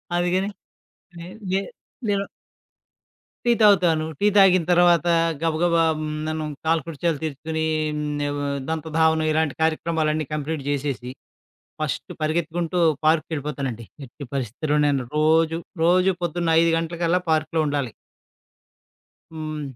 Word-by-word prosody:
అదిగని 180 +3 +1 0.8
ఏ - - -9 0.3
ఏ - - -3 0.5
నేను 200 -1 +1 1.2
టీ - - +6
తాగుతాను. 175 -7 +4
టీ 205 - +3
తాగిన 190 -3 +6
తర్వాత 175 -1 +4 0.3
గబగబ 165 +1 +1 0.2
హ్మ్. 155 0 -3 0.2
ననుం 155 -1 -3 0.2
కాలకృత్యాలు 165 0 0
తీర్చుకొని, 160 +1 -3 0.3
హ్మ్. 145 -1 -2 0.3
దంతధావనం 160 0 +1
ఇలాంటి 155 -2 0
కార్యక్రమాలన్నీ 155 -1 0
కంప్లీట్ 150 0 -3
జేసేసి, 140 -3 -2 0.7
ఫస్ట్ 155 0 -3
పరిగెత్తుకుంటూ 165 +2 -1 0.3
పార్క్‌కెళ్ళిపోతానండి. 145 -6 -1 0.2
ఎట్టి 135 +3 -11
పరిస్థితిలో 140 +4 -1
నేను 140 -3 +1
రోజు, 160 +1 +3 0.2
రోజు 180 +3 +4
పొద్దున్న 170 -1 0
5 165 0 +3
గంటలకల్లా 170 +1 0
పార్క్‌లో 155 +1 +1
ఉండాలి. 140 -4 -1 1.4
హ్మ్. 155 -1 -5
160 Hz, 105 wpm, -23 LUFS, 150-170 Hz, 1.4 s, టీ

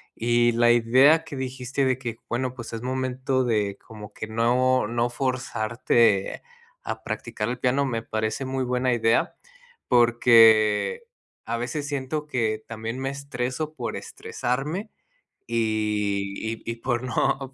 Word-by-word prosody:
y 120 +1 +2
la 120 +1 +4
idea 130 +7 +5
que 145 - -8
dijiste 130 0 -3
de 130 -1 +1
que 120 -3 -5
bueno, 125 +1 -1
pues, 120 -3 -8
es 115 -1 -5
momento 130 0 -1
de 105 -5 0
como 105 -2 -11
que 110 - -6
no 125 +2 +2
no 120 +1 0
forzarte 120 -4 +1 0.4
a - - -5
practicar 115 -2 -4
el 125 +1 -3
piano, 135 +3 +1
me 115 -4 -2
parece 110 +3 -2
muy 130 0 -2
buena 125 0 0
idea, 115 -1 +2 0.5
porque 115 - +5 0.4
a 115 - -2
veces 125 +5 -3
siento 145 +1 -3
que 110 -6 -1
también 115 +1 -5
me 135 0 -2
estreso 140 +2 -4
por - - -4
estresarme, 150 - -4 0.6
y 105 -3 -1
y 110 0 -4
y 115 - -4
por 120 0 -2
no 135 +1 -1
120 Hz, 140 wpm, -25 LUFS, 115-130 Hz, 0.6 s, idea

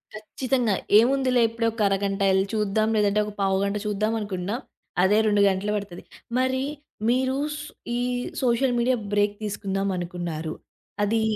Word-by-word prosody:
ఖచ్చితంగా. 240 +1 -1 0.3
ఏముందిలే 255 +1 +3
ఎప్పుడే 230 0 -1
ఒక 225 0 -5
అరగంట 195 0 -1
ఎళ్లి 190 +1 +2
చూద్దాం 215 0 +1
లేదంటే 210 0 +3
ఒక 210 - -6
పావు 195 -1 +2
గంట 200 +1 0
చూద్దాం 210 +1 0
అనుకున్నా 200 0 -3 0.5
అదే 200 +3 +4
2 205 -1 +3
గంటలు 195 +2 -1
పడతది. 200 -4 -5 0.3
మరి 260 +1 +1 0.5
మీరు 260 +2 +2 0.2
సు 295 0 -7 0.3
ఈ - - 0 0.4
సోషల్ 250 0 +2
మీడియా 250 +2 +3 0.2
బ్రేక్ 205 0 +2
తీసుకుందాం 195 -1 -2
అనుకున్నారు? 170 -3 -4 0.5
అది 220 +2 +2
210 Hz, 145 wpm, -25 LUFS, 195-235 Hz, 0.5 s, అదే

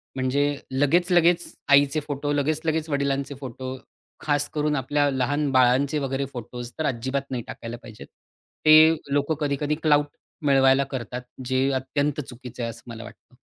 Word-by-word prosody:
म्हणजे 130 +2 +1 0.3
लगेचं-लगेचं 175 +5 +3 0.2
आईचे 140 +2 +5
फोटो, 145 0 -2
लगेचं-लगेचं 155 +2 -1
वडिलांचे 140 0 -1
फोटो. 130 0 -6 0.4
खास 145 -1 0
करून 150 0 0
आपल्या 145 +2 +1
लहान 140 +3 0
बाळांचे 130 +3 +3
वगैरे 135 0 -2
फोटोज 120 0 -7
तर 155 - 0
अजिबात 130 +2 -1
नाही 120 -3 -3
टाकायला 115 +1 -7
पाहिजेत. 110 -2 -12 0.6
ते 155 +1 +8 0.2
लोकं 145 +2 +1
कधी-कधी 145 0 -1
क्लाउट 145 -2 +4 0.4
मिळवायला 135 -1 +4
करतात. 125 -1 -5 0.2
जे 130 +1 +1
अत्यंत 145 +3 -1
चुकीचं 125 -2 -9
आहे 115 - -2
असं 115 - -10
मला 115 -1 -8
वाटतं. - - -15
140 Hz, 140 wpm, -24 LUFS, 130-150 Hz, 0.6 s, ते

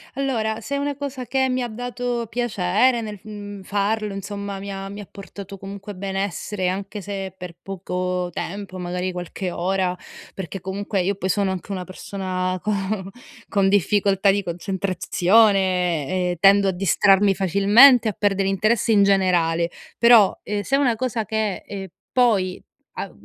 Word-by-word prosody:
Allora, 225 -5 -1
se 280 - -4
è - - 0
una 285 0 -2
cosa 275 -2 -5
che 265 +1 +1
mi 255 0 0
ha 245 - -1
dato 245 0 -3
piacere 235 +1 +1
nel 210 -2 -6
f - - -33
mhmm, 205 -2 -8
farlo, 205 +2 -1
insomma, 200 0 -5
mi 200 +1 -6
ha 195 0 -6
mi 200 +1 -8
ha 200 - -11
portato 200 0 -10
comunque 200 +1 -8
benessere, 195 0 -2
anche 195 +2 -4
se 195 -1 -5
per 180 -2 -8
poco 180 -1 -3
tempo, 195 +2 -6
magari 180 +1 -3
qualche 180 +1 -5
ora, 185 +1 0 0.4
perché 190 0 -6
comunque 195 +1 -2
io 195 +3 0
poi 190 0 -3
sono 200 0 +1
anche 190 +2 -6
una 185 -2 -3
persona 185 0 -4
co 210 - -1 0.8
con 195 -2 +2
difficoltà 200 0 +3
di 200 0 0
concentrazione 185 -1 +2
e 180 -1 -1
tendo 200 +1 +6
a - - +2
distrarmi 195 +2 +3
facilmente 205 - +6
a 215 - 0
perdere 195 -1 +1
interesse 215 +4 +1
in 200 -2 +5
generale, 175 -4 +2 0.3
però, 235 -4 +6
ehm, 205 0 -2
se 270 - 0
è 275 - +2
una 250 -5 +2
cosa 230 -2 -2
che 215 -2 -2
e 195 -3 -7 0.2
poi 205 -8 +2 0.3
a - - -5
195 Hz, 165 wpm, -22 LUFS, 185-215 Hz, 0.8 s, tendo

